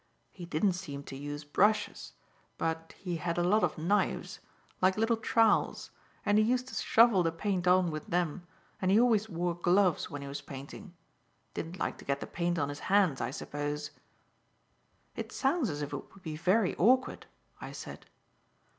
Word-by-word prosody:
He 175 - -9
didn't 180 +5 +2
seem 145 -6 -6
to 135 - -8
use 145 +2 -6
brushes, 210 +8 +1 0.4
but 165 0 -3
he 180 -3 -4
had 170 0 -2
a 175 - +2
lot 205 +5 +3
of 170 - 0
knives, 185 +7 0 0.4
like 185 +1 +3
little 225 +2 +2
trowels, 225 0 +2 0.3
and 205 0 +4
he - - +5
used 250 +3 +1
to - - -11
shovel 225 -4 +4
the 165 -1 +1
paint 180 +1 -2
on 180 -1 +4
with 155 -1 -6
them, 175 0 -1 0.3
and 185 - +1
he 200 +3 +5
always 220 -3 +3
wore 175 -1 -1
gloves 175 +1 +2
when 145 -1 -6
he - - -7
was 140 +1 -5
painting; 140 +7 -10 0.6
didn't 165 +3 -5
like - - -3
to - - -12
get 140 0 -1
the - - -5
paint 175 0 -2
on 145 -3 0
his 145 0 -6
hands, 190 -8 +3
I - - -1
suppose." 145 +2 -4 1.2
"It - - -5
sounds 275 - +1
as 150 -1 -3
if 145 - -6
it - - -7
would 195 - -17
be 155 -2 -5
very 185 +5 +2
awkward," 255 +7 +2 0.3
I - - -7
said. - - -9
180 Hz, 180 wpm, -31 LUFS, 155-205 Hz, 1.2 s, he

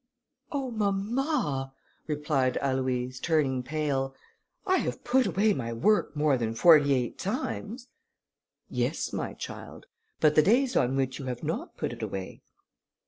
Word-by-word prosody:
"Oh, 275 -4 -2
mamma," 205 - -1 0.3
replied 150 -4 0
Aloïse, 130 -1 -1
turning 145 -6 +1
pale, 135 -1 -2 0.5
"I 375 0 +3
have - - -3
put 255 +1 +3
away 210 +2 +2
my 115 -7 -3
work 205 - +2
more 145 -3 +2
than 115 -1 -2
forty 145 +2 +6
eight 125 -2 -2
times." 215 - -4 0.8
"Yes, - - -2
my - - -3
child, - - -8 0.3
but 155 -1 +4
the 155 - +6
days 245 - +3
on 125 +2 +2
which 135 0 -1
you 135 - -6
have 125 -2 -5
not - - -4
put - - -2
it - - -9
away?" 95 -1 -5
145 Hz, 140 wpm, -28 LUFS, 130-210 Hz, 0.8 s, forty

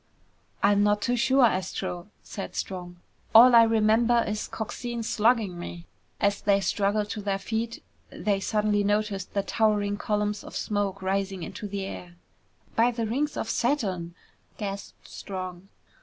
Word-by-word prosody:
"I'm 200 0 +4
not 205 0 +3
too 245 +4 0
sure, 260 +1 +4
Astro," 185 -3 -2 0.2
said 195 - -7
Strong. 180 -2 -5 0.4
"All 245 +2 +10
I 235 - +9
remember 225 +1 +3
is 210 0 -3
Coxine 235 +1 -5
slugging 220 -5 +1
me." 175 0 -7 0.3
As 200 -1 +1
they 200 -1 +3
struggled 205 +2 0
to 215 - -4
their 200 -1 -1
feet, 225 +3 -4 0.3
they 200 -2 -1
suddenly 210 +1 +1
noticed 205 -2 -1
the 200 - +1
towering 205 -2 +1
columns 210 0 -1
of - - -10
smoke 200 -2 -2
rising 195 -1 -1
into 210 - -6
the 200 -1 -4
air. 175 -2 -8 0.6
"By 230 +2 +4
the 235 -2 -2
rings 275 +7 -1
of - - -2
Saturn!" 190 -12 -1 0.4
gasped 200 -2 -6
Strong. 185 -1 -7
205 Hz, 145 wpm, -27 LUFS, 195-225 Hz, 0.6 s, All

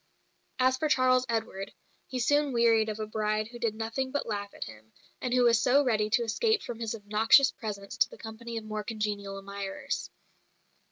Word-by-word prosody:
As 260 0 +3
for 310 +3 0
Charles 255 -2 +3
Edward, 220 -4 -2 0.4
he 255 - -4
soon 290 +3 +2
wearied 230 -2 +4
of 215 0 -4
a 215 - -2
bride 215 0 -1
who 240 0 -10
did 230 -3 -1
nothing 225 +4 -2
but 285 - -2
laugh 205 -2 -4
at - - -6
him, 110 -1 -12 0.3
and 250 - -2
who 250 0 +4
was 235 -1 +5
so 275 +3 +4
ready 215 -5 +1
to 235 +2 +2
escape 435 - +1
from 235 -2 -6
his 225 -1 -2
obnoxious 220 +6 +4
presence 200 -3 -6
to - - +3
the - - -12
company 230 +1 -7
of 225 - -4
more 215 0 -4
congenial 205 -3 -3
admirers. 200 +5 -5
225 Hz, 190 wpm, -29 LUFS, 210-250 Hz, 0.4 s, was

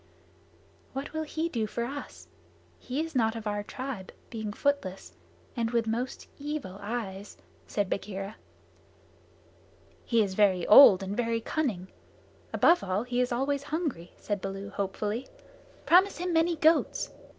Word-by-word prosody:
"What 270 +3 -5
will 315 - -1
he 315 +1 -2
do 230 -9 -2
for 235 - -3
us? 285 +3 -7 0.5
He 265 +4 -3
is 325 0 -5
not 225 -4 +2
of 225 -1 -6
our 205 -1 -1
tribe, 250 -3 -6 0.2
being 220 -2 -4
footless 205 - -2 0.4
and 230 -1 0
with 235 -1 +1
most 235 +4 -3
evil 285 -10 -5
eyes," 205 -2 -5 0.3
said 205 -2 -1
Bagheera. 195 +1 -4 1.7
"He 230 -2 +3
is 195 -2 -3
very 190 -3 +3
old 200 -5 +9
and 195 +1 -3
very 230 -1 0
cunning. 225 - -2 0.6
Above 345 +1 +4
all, 190 +3 -1
he 245 0 0
is 250 - 0
always 270 +3 0
hungry," 285 - -3
said 205 -2 -3
Baloo 195 +1 -5
hopefully. 205 +5 -3 0.6
"Promise 375 +3 +5
him 355 0 -2
many 330 +1 +3
goats." 320 +1 +2
230 Hz, 140 wpm, -29 LUFS, 200-285 Hz, 1.7 s, old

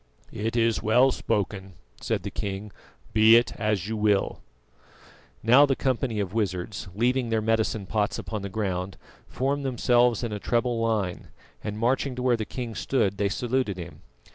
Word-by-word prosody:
"It 110 +2 -3
is 115 -1 +2
well 125 +5 +4
spoken," 100 -5 -2 0.3
said - - -1
the - - -5
king; 100 0 -5 0.4
"be 110 +1 +7
it 120 0 +3
as 105 -4 -1
you 110 - -2
will." 105 -2 +1 1.0
Now 130 +6 +7
the 135 - +1
company 125 -4 -1
of 100 -2 -3
wizards, 100 -2 -2
leaving 125 +2 +1
their 110 -1 +1
medicine 110 -1 0
pots 105 +2 -1
upon 105 -1 -5
the 100 - -5
ground, 95 -2 -3 0.3
formed 140 +2 -1
themselves 120 -2 +2
in 115 - -2
a 105 - -4
treble 120 +2 0
line, 110 -6 -1 0.4
and 105 0 -4
marching 125 +3 0
to 125 - -4
where 125 -2 +3
the 110 -2 -3
king 120 -1 -5
stood, 100 -3 0
they 100 -1 +2
saluted 120 -2 -1
him. 85 -4 -9
110 Hz, 165 wpm, -26 LUFS, 100-120 Hz, 1.0 s, be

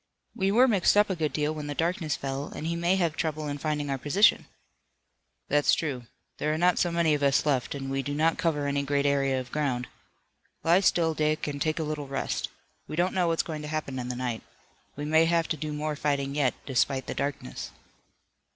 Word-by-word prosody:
"We 195 0 0
were 245 +5 +6
mixed 205 -3 +3
up 210 -1 +4
a - - 0
good 155 -3 -1
deal 150 0 0
when 150 -1 -6
the 145 - -4
darkness 165 -2 0
fell, 135 +1 -4
and - - -7
he 170 +1 -1
may 170 +2 +2
have 170 -4 0
trouble 155 -2 -2
in 145 0 -4
finding 150 -1 -1
our 135 - -2
position." 170 +11 +3 1.0
"That's 145 0 +3
true. 130 -7 -4 0.3
There 150 - 0
are 155 - 0
not 175 +2 +3
so 175 - +2
many 170 -2 +2
of 145 - 0
us 140 +1 +3
left, 140 -2 0
and 135 -1 -5
we 135 0 0
do 145 +2 -4
not 160 +2 +2
cover 150 -4 0
any 140 0 0
great 140 0 0
area 135 -2 +2
of 125 -1 -8
ground. 130 -5 -1 0.8
Lie 170 +3 +5
still, 170 -4 +2
Dick, 155 0 0
and 145 -1 -4
take 155 +1 0
a 160 - -1
little 150 -2 -4
rest. 135 - -2 0.4
We - - -5
don't 175 +3 +1
know 180 -2 +2
what's 165 -1 +1
going 155 -2 -5
to 150 - -6
happen 150 -4 -3
in 125 - -4
the 125 - -3
night. 120 -2 -3 0.5
We 145 - -5
may 160 +2 +4
have 165 0 +2
to - - 0
do 155 +1 -4
more 150 0 -2
fighting 140 -2 -1
yet, 140 -4 +1
despite 130 0 +1
the - - -4
darkness." 140 - -4
150 Hz, 225 wpm, -27 LUFS, 140-165 Hz, 1.0 s, were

